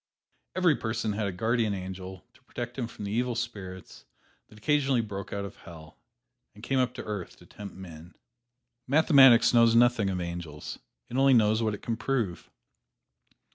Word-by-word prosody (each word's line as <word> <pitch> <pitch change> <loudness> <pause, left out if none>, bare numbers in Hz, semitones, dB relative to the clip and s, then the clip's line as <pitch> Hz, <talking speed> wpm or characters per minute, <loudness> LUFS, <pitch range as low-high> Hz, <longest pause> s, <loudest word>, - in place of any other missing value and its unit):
Every 180 -5 +3
person 110 -1 -2
had 105 0 -2
a - - -2
guardian 110 +2 0
angel 95 -1 -8
to - - -24
protect 120 0 -6
him 125 -4 -3
from 105 -2 -9
the 100 - -4
evil 120 +2 -1
spirits 95 - -7 0.4
that 105 - -17
occasionally 135 +1 +1
broke 100 -3 -7
out 100 0 -3
of 100 - -10
Hell 80 -2 -13 0.6
and 105 - -15
came 135 +2 0
up 125 -1 0
to - - -6
earth 105 -4 -6
to - - -18
tempt 100 -2 -10
men. 85 -2 -11 0.7
Mathematics 135 -5 +6
knows 115 -1 +5
nothing 120 -4 +4
of 95 -1 -2
angels 85 -4 -6 0.3
it 125 - -5
only 135 -1 +5
knows 110 0 +3
what 110 -2 0
it - - -14
can 115 -1 -2
prove. 115 -7 -2
110 Hz, 175 wpm, -28 LUFS, 95-120 Hz, 0.7 s, Mathematics